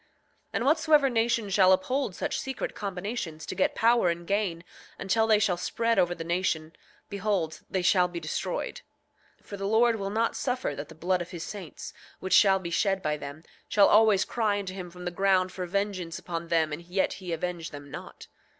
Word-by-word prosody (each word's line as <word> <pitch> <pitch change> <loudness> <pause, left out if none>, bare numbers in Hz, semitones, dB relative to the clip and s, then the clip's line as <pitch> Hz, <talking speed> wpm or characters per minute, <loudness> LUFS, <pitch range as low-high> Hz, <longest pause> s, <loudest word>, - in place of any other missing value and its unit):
8:22 - - -36 0.5
And 235 - -1
whatsoever 305 -1 +4
nation 230 -2 +1
shall 190 -1 +5
uphold 200 +3 +1
such - - -2
secret 265 -1 -4
combinations, 195 -4 -5
to - - -5
get 190 - +1
power 230 -5 +4
and 170 0 -3
gain, 195 -4 -1 0.3
until 220 +4 +1
they 215 -1 +5
shall 200 -4 +1
spread 230 +5 0
over 175 0 +2
the 165 - -6
nation, 165 -2 -1 0.3
behold, 200 -5 -1
they 190 -2 -1
shall 180 0 +4
be 175 -1 -6
destroyed; 155 -2 -3 0.6
for 200 - -8
the 195 0 -3
Lord 225 +2 +3
will 195 -1 -3
not 225 +3 0
suffer 255 -1 -1
that 145 0 -7
the 160 - -12
blood 180 +3 0
of 175 - -6
his 170 -3 -6
saints, 190 -4 -8 0.3
which 190 - -2
shall 195 -2 +6
be 175 -3 -6
shed 195 +1 +1
by 150 0 0
them, 145 +2 -8 0.3
shall 200 -1 +5
always 210 -2 +5
cry 215 -4 0
unto 195 -2 -4
him 185 -2 -7
from 180 +1 -10
the 175 - -2
ground 185 0 +2
for 180 -1 -5
vengeance 185 -3 -2
upon 170 -1 -5
them 160 -2 +1
and 150 - -5
yet 175 +3 -1
he 180 -2 -5
avenge 170 0 -3
them 145 -1 -10
not. - - -9
190 Hz, 200 wpm, -28 LUFS, 170-210 Hz, 0.6 s, shall